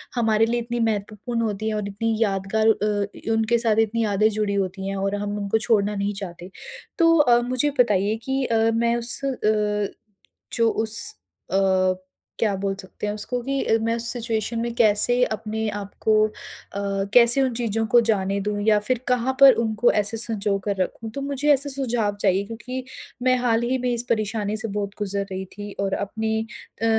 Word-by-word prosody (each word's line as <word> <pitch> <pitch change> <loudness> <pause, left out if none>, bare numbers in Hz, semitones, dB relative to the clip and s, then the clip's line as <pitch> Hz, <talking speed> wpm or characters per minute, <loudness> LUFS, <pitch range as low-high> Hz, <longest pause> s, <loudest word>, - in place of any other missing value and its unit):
हमारे 225 -2 +2
लिए 240 +1 -1
इतनी 240 +1 -4
महत्वपूर्ण 220 +1 -2
होती 215 -1 -2
हैं 215 - -2
और 210 -1 -3
इतनी 220 +3 -2
यादगार 200 +1 0
अ, 210 -2 +1
इ - - -8
उनके 225 +1 +2
साथ 225 -2 +1
इतनी 225 +1 +1
यादें 215 0 +2
जुड़ी 210 -1 -1
होती 195 -1 -2
हैं 195 - -3
और 195 +1 -1
हम 205 0 -3
उनको 200 +1 0
छोड़ना 210 -2 +1
नहीं 200 +1 -1
चाहते। 175 -1 -8 0.5
तो 330 -2 +5
अ, 245 -6 +5
मुझे 255 +4 0
बताइए 210 -3 +3
कि 265 0 -1
अ, 230 -2 +1 0.2
मैं 235 +1 +1
उस 235 0 +1
अ, - - +1 1.2
जो 230 -1 +2 0.2
उस 220 +1 -2 0.5
अ, 190 - +2 0.8
क्या 210 -3 +1
बोल 195 -1 -1
सकते 195 +1 -7
हैं 205 - -2
उसको 245 +4 -3
कि 275 +2 -1
अ, 225 - +2
मैं 230 +1 0
उस 235 0 +8
सिचुएशन 230 -1 -2
में 235 0 -2
कैसे 240 +2 +4
अपने 220 0 -3
आप 205 -1 -6
को 215 -1 +4
अ, - - -13 0.8
कैसे 245 +2 +6
उन 260 -2 +1
चीज़ों 225 -2 -1
को 240 +2 +5
जाने 200 -1 +1
दूँ 205 +1 -2
या 210 -1 +5
फिर 240 +4 -1
कहाँ 250 +1 +1
पर 275 -1 +10
उनको 220 +1 +2
ऐसे 210 +1 0
संजोकर 205 -3 -1
रखूँ? 225 +4 -7
तो 275 - -6
मुझे 280 +1 +2
ऐसे 285 +1 +1
सुझाव 240 -6 -1
चाहिए 195 0 +2
क्योंकि 235 +4 -6 0.4
मैं 255 0 +3
हाल 235 -2 +1
ही 250 +2 0
में 250 0 -1
इस 235 0 -1
परेशानी 215 -1 -1
से 220 +1 -4
बहुत 200 -1 -3
गुज़र 200 -1 -2
रही 190 0 -4
थी 205 0 -7
और 195 -1 -1
अपनी 220 +2 -2 0.4
अ, - - +3
220 Hz, 190 wpm, -23 LUFS, 205-235 Hz, 1.2 s, पर